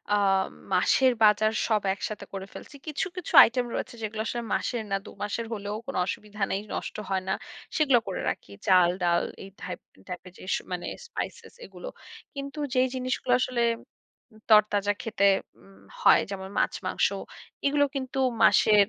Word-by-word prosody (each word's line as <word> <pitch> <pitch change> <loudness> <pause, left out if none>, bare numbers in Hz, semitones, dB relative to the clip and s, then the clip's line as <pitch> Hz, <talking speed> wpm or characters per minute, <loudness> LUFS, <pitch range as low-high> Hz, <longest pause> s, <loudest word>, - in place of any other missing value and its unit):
আম 195 -2 +3 0.3
মাসের 255 +8 +4
বাজার 215 +1 +5
সব 215 -3 +2
একসাথে 210 +2 -5
করে 195 0 -5
ফেলছি। 295 - -11
কিছু, 305 +5 -1
কিছু 360 - -5
আইটেম 245 +1 +1
রয়েছে - - -4
যেগুলো 215 0 -3
আসলে 240 - -2
মাসের 240 -3 -1
না 195 - +2
২ - - -9
মাসের 225 +3 -2
হলেও 205 0 -4
কোন 275 - -5
অসুবিধা 210 +2 -6
নেই। 195 - 0
নষ্ট - - -4
হয় 190 -1 0
না। 190 - +1 0.4
সেগুলা 275 -6 +5
করে 190 - -3
রাখি। 100 - -6 0.2
চাল, 180 -2 +6
ডাল 170 0 +3 0.2
এই 195 - -9
থাইপ 180 - -5 0.3
টাইপের 180 0 -7
যে - - -12
স - - 0
মানে 175 -1 -3 0.2
স্পাইসএস - - -6
এইগুলো। - - -10 0.5
কিন্তু 280 +2 -6
যেই 255 0 +4
জিনিসগুলা 255 0 0
আসলে 250 -1 0 0.9
তরতাজা 205 -1 +5
খেতে 215 -3 +1 0.3
উম 95 +1 -19 0.2
হয় - - +7
যেমন 190 -1 -5
মাছ, - - +2
মাংস - - +2 0.6
এগুলো 285 +1 +4
কিন্তু 270 -1 -3 0.2
মাসের, 205 -2 +6
210 Hz, 160 wpm, -27 LUFS, 195-255 Hz, 0.9 s, হয়